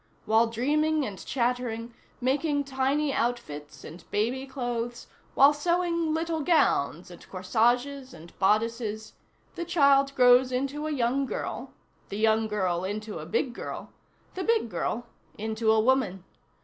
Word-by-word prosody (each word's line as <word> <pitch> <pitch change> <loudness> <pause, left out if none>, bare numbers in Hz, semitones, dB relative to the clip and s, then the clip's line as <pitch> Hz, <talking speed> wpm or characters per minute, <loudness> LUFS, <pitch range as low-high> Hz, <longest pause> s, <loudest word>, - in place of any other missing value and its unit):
While 220 +2 +4
dreaming 300 +6 +1
and 200 -5 -7
chattering, 240 -2 -2 0.3
making 285 +3 0
tiny 275 +2 0
outfits, 230 - -3
and 165 +2 -10
baby 250 +6 -1
clothes, 240 -2 -4 0.3
while 280 +2 +7
sewing 335 +1 0
little 325 0 -1
gowns, 180 - +1
and 175 - -14
corsages 245 +8 0
and 170 -3 -13
bodices, 215 +2 0 0.4
the 345 - -4
child 280 -5 +3
grows 250 0 +6
into 275 +4 -2
a - - -2
young 265 0 0
girl, - - -5 0.4
the 200 - -5
young 220 0 +2
girl 185 -4 -1
into 210 +1 -4
a 155 - -8
big 240 +8 -1
girl, - - -7 0.4
the 370 - -4
big 450 - +1
girl 240 +2 -2 0.3
into 220 +1 0
a 220 - +4
woman. 220 -6 +1
245 Hz, 135 wpm, -27 LUFS, 220-280 Hz, 0.4 s, while